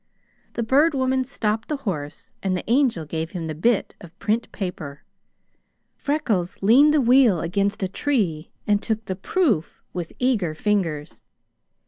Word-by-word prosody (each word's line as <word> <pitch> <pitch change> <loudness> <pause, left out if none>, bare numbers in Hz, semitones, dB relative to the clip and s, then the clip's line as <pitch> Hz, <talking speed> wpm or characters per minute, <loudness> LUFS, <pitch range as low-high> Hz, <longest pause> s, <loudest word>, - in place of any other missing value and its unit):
The 235 - -2
Bird 285 +7 +3
Woman 260 0 +1
stopped 225 -4 -2
the 300 - -2
horse 150 -7 -5
and 185 -1 0
the - - -5
Angel 235 - +2
gave 160 +3 -4
him 165 - -4
the 160 - -3
bit 205 +8 +1
of 175 +1 -13
print 225 +3 -1
paper. 165 -7 -6 0.9
Freckles 220 - -1
leaned 265 +9 +6
the 305 - +3
wheel 245 -7 +5
against 200 +5 -1
a - - +1
tree 185 - -1 0.2
and 205 -1 +2
took 220 -1 -2
the 185 - -3
proof 215 - 0
with 175 -2 -5
eager 215 -11 +1
fingers. 165 -6 -1
205 Hz, 150 wpm, -23 LUFS, 170-255 Hz, 0.9 s, leaned